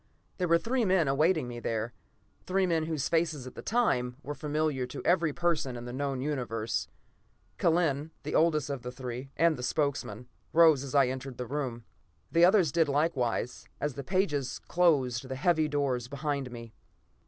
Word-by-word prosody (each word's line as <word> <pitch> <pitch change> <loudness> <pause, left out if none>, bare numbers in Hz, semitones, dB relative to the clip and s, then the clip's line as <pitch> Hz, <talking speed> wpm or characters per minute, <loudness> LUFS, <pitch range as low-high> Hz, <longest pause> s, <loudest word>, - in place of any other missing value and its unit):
There 180 - +1
were 170 0 +5
three 240 +6 0
men 185 -6 +3
awaiting 155 +1 +2
me 120 -1 -6
there; 115 0 -2 0.5
three 190 +1 +2
men 165 -3 +1
whose 155 -4 -1
faces, 160 -5 0
at 130 - -9
that - - -10
time, 125 - +1
were 145 - -4
familiar 150 -3 -1
to 125 - -8
every 170 -3 +3
person 155 -6 -1
in 120 - -7
the 120 - -6
known 135 -1 -2
Universe. 120 -6 -2 0.7
Kellen, 160 -3 +2
the - - -4
oldest 155 -4 +2
of 140 -3 -4
the 125 +1 -6
three, 125 +1 -6
and 165 -2 +3
the - - -6
spokesman, 125 -4 -2 0.3
rose 160 -4 +6
as 140 0 -6
I 140 -1 +6
entered 130 0 -5
the 125 - -4
room. 125 -4 -4 0.5
The 170 +1 +4
others 185 -5 +4
did 160 0 +2
likewise, 140 -5 0
as 145 -1 -1
the 140 - -6
pages 150 -6 0
closed 135 -8 +2
the 130 - -3
heavy 155 +2 +2
doors 140 -5 -1
behind 140 -1 -3
me. 115 -2 -9
145 Hz, 175 wpm, -29 LUFS, 125-165 Hz, 0.7 s, rose